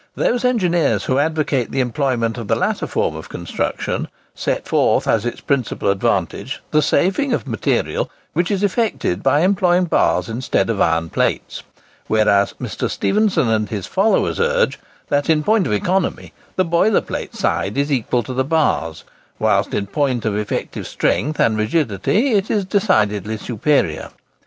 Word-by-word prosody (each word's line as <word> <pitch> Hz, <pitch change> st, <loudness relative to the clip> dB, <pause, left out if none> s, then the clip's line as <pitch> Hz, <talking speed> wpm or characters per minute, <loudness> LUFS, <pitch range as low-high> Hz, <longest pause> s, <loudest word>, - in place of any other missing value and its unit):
Those 245 Hz, 0 st, 0 dB
engineers 175 Hz, -, +2 dB
who 130 Hz, +1 st, +1 dB
advocate 150 Hz, -4 st, 0 dB
the -, -, -2 dB
employment 125 Hz, -3 st, 0 dB
of 115 Hz, -, -6 dB
the -, -, +2 dB
latter -, -, -1 dB
form -, -, -1 dB
of -, -, -9 dB
construction, -, -, -3 dB, 0.3 s
set -, -, -2 dB
forth -, -, +2 dB
as 115 Hz, +1 st, +1 dB
its 120 Hz, -, -5 dB
principal 130 Hz, -7 st, 0 dB
advantage 100 Hz, +3 st, -1 dB
the 155 Hz, -, +4 dB
saving 195 Hz, -, +1 dB
of -, -, -1 dB
material -, -, -1 dB, 0.2 s
which 175 Hz, +1 st, 0 dB
is 200 Hz, -1 st, -1 dB
effected 205 Hz, -, 0 dB
by 145 Hz, -, +3 dB
employing 185 Hz, -1 st, +3 dB
bars 175 Hz, -, +1 dB
instead 115 Hz, 0 st, 0 dB
of 105 Hz, -, -2 dB
iron 80 Hz, 0 st, +1 dB
plates; -, -, -1 dB, 0.5 s
whereas 105 Hz, -2 st, +2 dB
Mr. -, -, -3 dB
Stephenson 210 Hz, -, +1 dB
and 110 Hz, -2 st, 0 dB
his 105 Hz, -4 st, -4 dB
followers 205 Hz, +4 st, +1 dB
urge, 485 Hz, +1 st, +1 dB, 0.3 s
that 145 Hz, +2 st, 0 dB
in 155 Hz, -1 st, +3 dB
point 215 Hz, 0 st, +2 dB
of -, -, -1 dB
economy 185 Hz, -, -1 dB, 0.2 s
the 185 Hz, -, +2 dB
boiler 170 Hz, +5 st, +3 dB
plate -, -, -6 dB
side 100 Hz, +6 st, -1 dB
is 140 Hz, +1 st, 0 dB
equal 125 Hz, -2 st, 0 dB
to 130 Hz, -, -6 dB
the 130 Hz, +1 st, +1 dB
bars, 130 Hz, -, 0 dB, 0.3 s
whilst -, -, +1 dB
in 100 Hz, -, -1 dB
point 130 Hz, +2 st, -1 dB
of 110 Hz, -2 st, 0 dB
effective 105 Hz, 0 st, -3 dB
strength 150 Hz, +3 st, -1 dB
and 110 Hz, -1 st, +2 dB
rigidity 145 Hz, -, +1 dB
it 205 Hz, -2 st, +1 dB
is 205 Hz, -3 st, 0 dB
decidedly 110 Hz, -, +1 dB
superior. 110 Hz, -, 0 dB
140 Hz, 160 wpm, -19 LUFS, -, 0.5 s, the